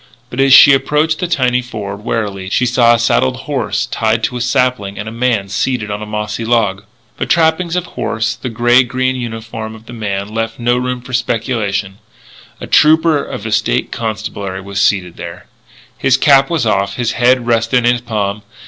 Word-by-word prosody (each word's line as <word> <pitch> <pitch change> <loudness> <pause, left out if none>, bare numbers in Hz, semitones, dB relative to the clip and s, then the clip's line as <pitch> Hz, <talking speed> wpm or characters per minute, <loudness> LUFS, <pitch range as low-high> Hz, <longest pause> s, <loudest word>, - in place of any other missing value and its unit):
But 125 - -6
as 135 0 +4
she 140 +1 +9
approached 150 +3 +1
the 180 - -1
tiny 125 -6 +1
ford, 105 -4 -7
warily, 100 -4 -3
she 125 - +1
saw 120 -1 +4
a - - -1
saddled 130 +2 +1
horse 135 -2 -2
tied 110 0 -1
to 125 - -1
a - - -4
sapling 120 -4 0
and 105 - -5
a - - -5
man 115 -4 0
seated 105 +2 -2
on 105 +1 -4
a 105 - -6
mossy 105 +1 -4
log. 105 -4 0 0.3
The - - -2
trappings 165 +1 +2
of 180 -1 -1
horse, 110 -8 -2
the 120 +3 -6
grey 120 +2 +4
green 130 +1 -1
uniform 115 -2 -6
of 110 0 -15
the 120 - -10
man, 100 -3 -4
left 115 0 -3
no 120 0 +1
room 125 0 -2
for 125 +1 -11
speculation; 110 -5 -2 0.6
a - - -6
trooper 155 -1 +4
of - - -7
the - - -4
State - - 0
Constabulary 100 -3 -4
was 100 +1 -3
seated 95 -4 +1
there. 85 +1 -8 0.5
His 130 0 +3
cap 135 -1 +4
was 165 -7 0
off; 100 -2 0
his 120 -2 -1
head 125 +1 +2
rested 115 +1 +1
on 125 - +1
his 120 -1 -1
palm. 105 -3 -3
115 Hz, 195 wpm, -15 LUFS, 105-125 Hz, 0.6 s, she